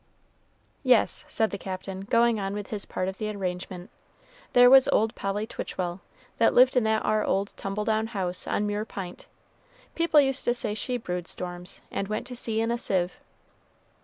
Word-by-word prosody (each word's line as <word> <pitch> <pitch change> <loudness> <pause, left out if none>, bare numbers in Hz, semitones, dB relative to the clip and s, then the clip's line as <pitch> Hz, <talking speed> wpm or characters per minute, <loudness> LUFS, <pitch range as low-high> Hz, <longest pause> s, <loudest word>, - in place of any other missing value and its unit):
"Yes," 255 -4 +3
said 220 -1 0
the 200 - -4
Captain, 190 0 -6
going 230 +1 +3
on 195 0 -3
with 205 -1 -6
his 205 -3 -1
part 185 - -3
of 190 0 -5
the 215 - -2
arrangement, 185 -2 -5 0.6
"there 245 0 +8
was 265 +1 +8
old 220 +1 +2
Polly 200 +1 -2
Twitchell, 180 -4 -4 0.4
that 230 - +4
lived 255 +1 +6
in 250 - +4
that 220 0 +1
ar 215 0 +2
old 200 +1 0
tumble 200 +2 -3
down 220 0 +1
house 185 -5 -3
on 210 - 0
Mure 205 0 -1
P'int; 190 -4 -8 0.7
people 335 -2 +4
used 270 -1 +3
to 240 - +2
say 225 -3 -2
she 245 +4 -2
brewed 180 -6 -4
storms, 180 0 -6
and 195 - -2
went 215 +3 -3
to 250 0 -8
sea 225 -2 -1
in 225 +1 0
a 235 - -1
sieve." 180 -5 -1
210 Hz, 185 wpm, -27 LUFS, 190-235 Hz, 0.7 s, there